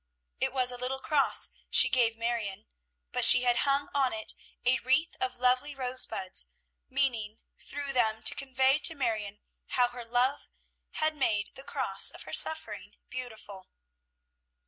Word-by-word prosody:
It 265 Hz, 0 st, -1 dB
was 255 Hz, -1 st, 0 dB
a 245 Hz, -, -5 dB
little 255 Hz, +2 st, -3 dB
cross 280 Hz, +1 st, +2 dB, 0.2 s
she -, -, +8 dB
gave 230 Hz, -3 st, +1 dB
Marion, 225 Hz, -4 st, -4 dB, 0.5 s
but -, -, 0 dB
she 250 Hz, -, +9 dB
had 245 Hz, -1 st, +2 dB
hung 280 Hz, +1 st, +1 dB
on 270 Hz, -3 st, +1 dB
it 220 Hz, 0 st, -3 dB, 0.3 s
a 255 Hz, +1 st, +3 dB
wreath 270 Hz, +7 st, 0 dB
of 255 Hz, 0 st, -2 dB
lovely 255 Hz, +4 st, +1 dB
rosebuds, 250 Hz, -7 st, -1 dB, 0.4 s
meaning, 240 Hz, -6 st, -1 dB, 0.2 s
through 285 Hz, -1 st, -6 dB
them, 220 Hz, -3 st, 0 dB
to -, -, +3 dB
convey 265 Hz, +1 st, +1 dB
to 320 Hz, -, +1 dB
Marion 215 Hz, -6 st, -3 dB, 0.3 s
how 245 Hz, -1 st, +1 dB
her 245 Hz, 0 st, -9 dB
love 245 Hz, +4 st, 0 dB, 0.5 s
had 310 Hz, 0 st, -1 dB
made 215 Hz, -8 st, -1 dB
the -, -, -11 dB
cross -, -, +1 dB
of -, -, -7 dB
her -, -, -11 dB
suffering 315 Hz, 0 st, -1 dB, 0.2 s
beautiful. 220 Hz, -6 st, -9 dB
250 Hz, 150 wpm, -28 LUFS, 230-270 Hz, 0.5 s, she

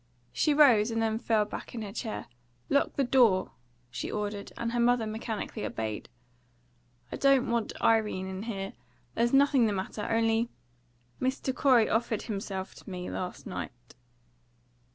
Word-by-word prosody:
She 300 Hz, -, +2 dB
rose, 240 Hz, -8 st, +6 dB
and 225 Hz, 0 st, -1 dB
then 220 Hz, 0 st, 0 dB
fell 220 Hz, -3 st, +2 dB
back 210 Hz, -, -8 dB
in 225 Hz, -, -4 dB
her 200 Hz, -, -6 dB
chair. 225 Hz, -1 st, -4 dB, 0.4 s
"Lock 280 Hz, -, +2 dB
the 280 Hz, -, +2 dB
door!" 240 Hz, -7 st, +4 dB, 0.4 s
she 120 Hz, -1 st, -4 dB
ordered, 205 Hz, -1 st, -4 dB
and 230 Hz, 0 st, -2 dB
her 240 Hz, -, -1 dB
mother 240 Hz, -1 st, +3 dB
mechanically 220 Hz, 0 st, -4 dB
obeyed. 110 Hz, -1 st, -4 dB, 1.0 s
"I -, -, -4 dB
don't 275 Hz, -3 st, +3 dB
want 235 Hz, -2 st, -1 dB
Irene 215 Hz, -4 st, +2 dB
in 190 Hz, 0 st, -5 dB
here. 195 Hz, -2 st, -4 dB, 0.4 s
There's 235 Hz, +1 st, +1 dB
nothing 275 Hz, -3 st, +5 dB
the 210 Hz, -, 0 dB
matter. 200 Hz, +2 st, -4 dB
Only, 225 Hz, +1 st, +2 dB, 0.7 s
Mr. 260 Hz, 0 st, -1 dB
Corey 250 Hz, -6 st, +5 dB
offered 225 Hz, -1 st, 0 dB
himself 195 Hz, -3 st, -4 dB
to -, -, -12 dB
me 180 Hz, -1 st, -5 dB
last 180 Hz, -1 st, -5 dB
night." 120 Hz, -, -7 dB
225 Hz, 155 wpm, -29 LUFS, 200-240 Hz, 1.0 s, rose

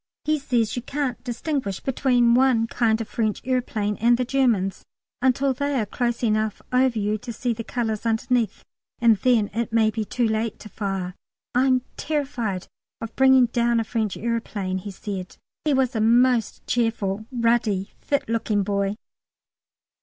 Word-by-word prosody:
He 310 Hz, 0 st, +1 dB
says 240 Hz, -5 st, 0 dB
you 245 Hz, -, -2 dB
can't 270 Hz, -1 st, -3 dB
distinguish 245 Hz, -, -3 dB
between 245 Hz, -3 st, +2 dB
one 250 Hz, -2 st, +4 dB
kind 230 Hz, -1 st, +1 dB
of 225 Hz, -, -4 dB
French 215 Hz, -3 st, -1 dB
aeroplane 230 Hz, -5 st, -1 dB
and 235 Hz, +2 st, +4 dB
the 250 Hz, -, 0 dB
Germans 235 Hz, -8 st, +1 dB, 0.4 s
until 265 Hz, +1 st, +2 dB
they 285 Hz, +1 st, -1 dB
are 215 Hz, -, 0 dB
close 240 Hz, +3 st, -2 dB
enough 215 Hz, -1 st, +1 dB
over 255 Hz, -2 st, +3 dB
you 210 Hz, +1 st, 0 dB
to 235 Hz, -, -7 dB
see 240 Hz, +1 st, -1 dB
the 230 Hz, 0 st, -6 dB
colours 220 Hz, -2 st, -2 dB
underneath, 230 Hz, -1 st, 0 dB, 0.3 s
and 230 Hz, -2 st, +4 dB
then 225 Hz, -1 st, +2 dB
it 235 Hz, +1 st, -2 dB
may 220 Hz, -1 st, +3 dB
be 220 Hz, 0 st, -2 dB
too 235 Hz, +3 st, 0 dB
late 220 Hz, 0 st, -1 dB
to 215 Hz, -, -10 dB
fire. 195 Hz, -3 st, -3 dB, 0.4 s
"I'm 255 Hz, 0 st, +3 dB
terrified 265 Hz, -, -2 dB, 0.3 s
of 225 Hz, 0 st, -7 dB
bringing 265 Hz, -1 st, +6 dB
down 235 Hz, 0 st, +1 dB
a -, -, +1 dB
French 220 Hz, -3 st, -2 dB
aeroplane," 210 Hz, -5 st, -2 dB
he 205 Hz, -, -7 dB
said. 190 Hz, -1 st, -6 dB, 0.3 s
He 295 Hz, -2 st, +3 dB
was 260 Hz, -1 st, +1 dB
a 220 Hz, -, +1 dB
most 240 Hz, +1 st, +3 dB
cheerful, 220 Hz, -3 st, -1 dB
ruddy, 230 Hz, -5 st, +1 dB
fit 285 Hz, -, -1 dB
looking 220 Hz, -2 st, 0 dB
boy. 200 Hz, 0 st, -1 dB
230 Hz, 160 wpm, -24 LUFS, 215-250 Hz, 0.4 s, bringing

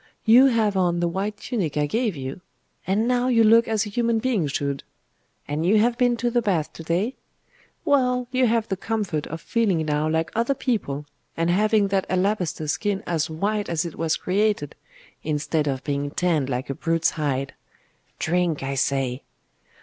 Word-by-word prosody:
You 240 Hz, +4 st, +7 dB
have 220 Hz, -5 st, +2 dB
on 175 Hz, -2 st, +1 dB
the 175 Hz, -, +1 dB
white 200 Hz, +4 st, -3 dB
tunic 200 Hz, -, -3 dB
I 150 Hz, -, +2 dB
gave 220 Hz, -, -1 dB
you? 135 Hz, +4 st, -6 dB, 0.5 s
And 210 Hz, +5 st, +1 dB
now 250 Hz, 0 st, +2 dB
you 235 Hz, -3 st, +4 dB
look 230 Hz, +2 st, +6 dB
as 220 Hz, -1 st, 0 dB
a -, -, -6 dB
human 230 Hz, +2 st, +1 dB
being 220 Hz, -, 0 dB
should. 140 Hz, 0 st, -2 dB, 0.7 s
And 150 Hz, +2 st, -2 dB
you 195 Hz, +5 st, +4 dB
have 235 Hz, +3 st, +3 dB
been 245 Hz, -1 st, +2 dB
to 240 Hz, +1 st, -1 dB
the 240 Hz, 0 st, +2 dB
baths 180 Hz, -9 st, 0 dB
to -, -, -9 dB
day? 180 Hz, +10 st, -1 dB, 0.7 s
Well 250 Hz, -4 st, +2 dB
you 255 Hz, -1 st, +3 dB
have 230 Hz, -1 st, +1 dB
the 190 Hz, -, -1 dB
comfort 195 Hz, -7 st, -2 dB
of 160 Hz, -, -6 dB
feeling 195 Hz, -4 st, 0 dB
now 150 Hz, +1 st, 0 dB
like 160 Hz, +1 st, 0 dB
other 235 Hz, +5 st, +1 dB
people, 165 Hz, -, -2 dB, 0.3 s
and 165 Hz, +1 st, +1 dB
having 210 Hz, +1 st, +3 dB
that 195 Hz, -1 st, 0 dB
alabaster 180 Hz, -4 st, 0 dB
skin 200 Hz, +6 st, -1 dB
as 165 Hz, -1 st, -1 dB
white 205 Hz, +6 st, -1 dB
as 170 Hz, +1 st, 0 dB
it 170 Hz, -, -5 dB
was 160 Hz, -1 st, -1 dB
created, 200 Hz, -5 st, 0 dB, 0.5 s
instead 150 Hz, 0 st, -1 dB
of 135 Hz, -1 st, -2 dB
being 145 Hz, -1 st, -2 dB
tanned 155 Hz, -4 st, 0 dB
like 130 Hz, +2 st, -2 dB
a -, -, -1 dB
brute's 165 Hz, +3 st, 0 dB
hide. 135 Hz, -3 st, -2 dB, 0.6 s
Drink, 170 Hz, -3 st, 0 dB
I 135 Hz, +1 st, -2 dB
say! 135 Hz, -1 st, 0 dB
185 Hz, 180 wpm, -24 LUFS, 155-225 Hz, 0.7 s, You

